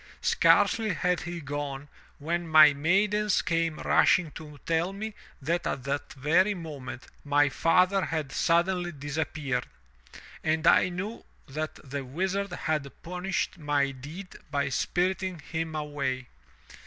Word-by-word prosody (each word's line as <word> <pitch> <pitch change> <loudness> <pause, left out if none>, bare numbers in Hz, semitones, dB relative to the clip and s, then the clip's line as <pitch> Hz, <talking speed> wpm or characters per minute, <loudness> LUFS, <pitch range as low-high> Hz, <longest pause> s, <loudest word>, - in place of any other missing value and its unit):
"Scarcely 220 -5 +3
had 180 +1 +1
he 175 0 -5
gone, 145 -1 -5 0.3
when 170 +3 -2
my 155 -2 +8
maidens 200 +7 +2
came 165 -2 0
rushing 170 -4 +3
to 150 -1 -10
tell 165 +3 0
me 215 +2 -5 0.3
that 165 +5 -1
at 130 - -3
that 140 +2 -3
very 170 +9 +2
moment, 145 -7 -7 0.2
my 145 0 +3
father 185 +6 +3
had 155 -4 -3
suddenly 175 +3 +1
dis 145 -1 -7
appeared, 140 -5 -2 0.8
and 160 +1 0
I 180 - +6
knew 195 +6 -5 0.2
that 155 +3 -4
the 140 +1 -4
Wizard 190 +8 -2
had 155 -5 -2
punished 180 +1 -3
my 145 -2 +1
deed 150 +9 -9
by 140 -1 0
spiriting 180 +6 -1
him 160 +1 -4
away. 145 -4 -2
160 Hz, 130 wpm, -28 LUFS, 145-180 Hz, 0.8 s, my